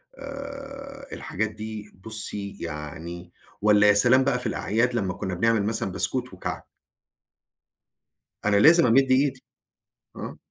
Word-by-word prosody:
آآ 275 - -8
الحاجات 110 +3 -2
دي 110 -1 -7
بُصّي 105 -2 -5
يعني 85 +2 -7 0.3
والّا 105 0 +5
يا 105 - +7
سلام 125 +5 +5
بقى 130 -2 +1
في - - -1
الأعياد 115 +4 0
لمّا 95 -6 0
كُنّا 95 0 -4
بنعمل 110 +3 +2
مثلًا 105 -3 -1
بسكوت 125 +6 -2
وكعك! - - -5 1.8
أنا 105 -1 +3
لازم 165 +10 +7
أمِدّ 130 +3 +4
إيدي. 130 0 +2 0.7
آه. - - -7
110 Hz, 125 wpm, -25 LUFS, 100-135 Hz, 1.8 s, يا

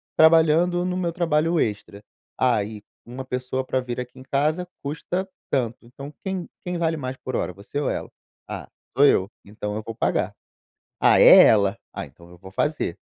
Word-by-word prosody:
trabalhando 165 +2 +5
no 180 0 -1
meu 175 -2 -1
trabalho 165 -1 +1
extra.". 105 -2 -3 0.3
"Ah 125 -5 +2
e, 105 0 -8 0.2
uma 125 +3 -7
pessoa 125 0 -3
pra 130 - 0
vir 125 -1 -5
aqui 125 +1 -7
em - - -11
casa 155 +7 0 0.2
custa 165 +6 -3 0.2
tanto.", 120 -4 0
então 140 +4 -10
quem 190 -3 -3 0.2
quem 180 -1 -2
vale 165 -1 0
mais 130 -2 -5
por 130 - -5
hora, 90 - -2
você 100 +9 -6
ou 145 - 0
ela? - - -4 0.4
"Ah, - - -6 0.3
sou 140 - +7
eu, 100 -6 +3
então 105 0 -5
eu 110 - -3
vou 115 - -6
pagar.". - - 0 0.7
"Ah, - - +5
é - - +10
ela. 100 0 +3
Ah, - - -5
então 85 +5 -17
eu 90 - -14
vou 95 +2 -12
fazer.". 150 - -1
130 Hz, 185 wpm, -24 LUFS, 110-160 Hz, 0.7 s, é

